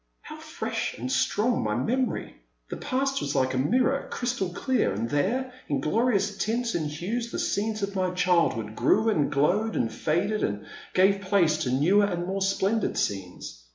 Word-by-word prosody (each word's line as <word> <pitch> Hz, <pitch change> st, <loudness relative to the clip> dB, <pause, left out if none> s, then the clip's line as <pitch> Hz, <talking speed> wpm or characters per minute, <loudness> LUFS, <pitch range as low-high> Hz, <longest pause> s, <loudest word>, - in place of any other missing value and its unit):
How -, -, -9 dB
fresh -, -, -4 dB
and 125 Hz, +3 st, -4 dB
strong 210 Hz, -, +1 dB
my 105 Hz, -1 st, -1 dB
memory! 245 Hz, -, -1 dB, 0.4 s
The -, -, -3 dB
past 270 Hz, +1 st, -1 dB
was 140 Hz, +1 st, -2 dB
like 130 Hz, -1 st, +1 dB
a 130 Hz, -, 0 dB
mirror, 255 Hz, -, +1 dB
crystal 245 Hz, -7 st, -2 dB
clear, 260 Hz, +8 st, 0 dB
and 105 Hz, +4 st, -2 dB
there, 240 Hz, -, 0 dB
in 140 Hz, -2 st, 0 dB
glorious 205 Hz, -, +1 dB
tints 230 Hz, +4 st, 0 dB
and 155 Hz, -3 st, -1 dB
hues, 215 Hz, +11 st, -3 dB
the -, -, -5 dB
scenes 215 Hz, +1 st, -1 dB
of 200 Hz, 0 st, -3 dB
my 185 Hz, -1 st, +1 dB
childhood 170 Hz, -12 st, +1 dB
grew 220 Hz, +1 st, +3 dB
and 155 Hz, -10 st, +1 dB
glowed 195 Hz, +11 st, +1 dB
and 115 Hz, -, 0 dB
faded, 175 Hz, +7 st, 0 dB
and 105 Hz, 0 st, -2 dB, 0.3 s
gave 195 Hz, +1 st, +4 dB
place 185 Hz, -6 st, +2 dB
to 130 Hz, -5 st, -1 dB
newer 180 Hz, +11 st, +4 dB
and 175 Hz, -3 st, -2 dB
more 195 Hz, +2 st, -3 dB
splendid 195 Hz, +3 st, 0 dB
scenes. 90 Hz, -11 st, -4 dB
190 Hz, 175 wpm, -26 LUFS, 145-225 Hz, 0.4 s, gave